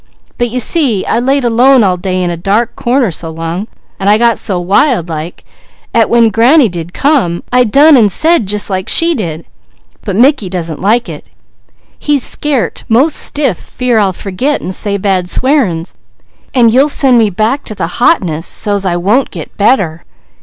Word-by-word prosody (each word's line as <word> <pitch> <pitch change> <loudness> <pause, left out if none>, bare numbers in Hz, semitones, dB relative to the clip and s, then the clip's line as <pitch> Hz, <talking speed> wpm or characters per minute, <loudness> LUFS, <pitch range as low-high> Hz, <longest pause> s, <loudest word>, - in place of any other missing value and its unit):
But 240 0 0
you 250 +2 -3
see, 250 - +1
I 230 - 0
laid 270 +2 0
alone 245 +2 +4
all 185 -2 +1
day 185 0 -3
in 175 - -2
a - - -3
dark 205 +7 -1
corner 245 -3 0
so 165 0 -3
long, 165 +5 -5 0.3
an' 195 - -3
I 210 +1 +4
got 235 0 +1
so 185 -3 -1
wild 190 - +1
like, 160 +2 -7 0.5
'at 230 -2 +2
when 235 -1 +3
granny 245 +4 +3
did 170 -1 -7
come, 240 - 0
I 250 0 +3
done 285 +7 +5
an' 225 -5 +4
said 315 - +1
jus' 210 +1 -2
like 190 -2 -3
she 335 +1 +3
did, 170 - -5 0.6
but 200 -4 -4
Mickey 245 -3 +2
doesn't 170 -4 -5
like 230 +5 +1
it. - - -10 0.7
He's 290 -4 0
scairt 285 -5 -2
'most 265 +8 +2
stiff 275 - 0
fear 250 -3 -2
I'll 200 -2 +1
forget 200 +11 -3
an' 185 - -6
say 200 +1 -1
bad 185 -2 -1
swearin's, 220 - 0 0.6
an' 240 -3 +4
you'll 265 +6 +3
send 260 -4 +3
me 220 -2 +2
back 220 +9 -1
to 215 - -6
the 170 +4 -5
hotness, 170 - +1
so's 200 -2 -1
I 175 - -1
won't 205 +10 0
get - - -9
better. 195 -7 0
215 Hz, 180 wpm, -11 LUFS, 185-255 Hz, 0.7 s, done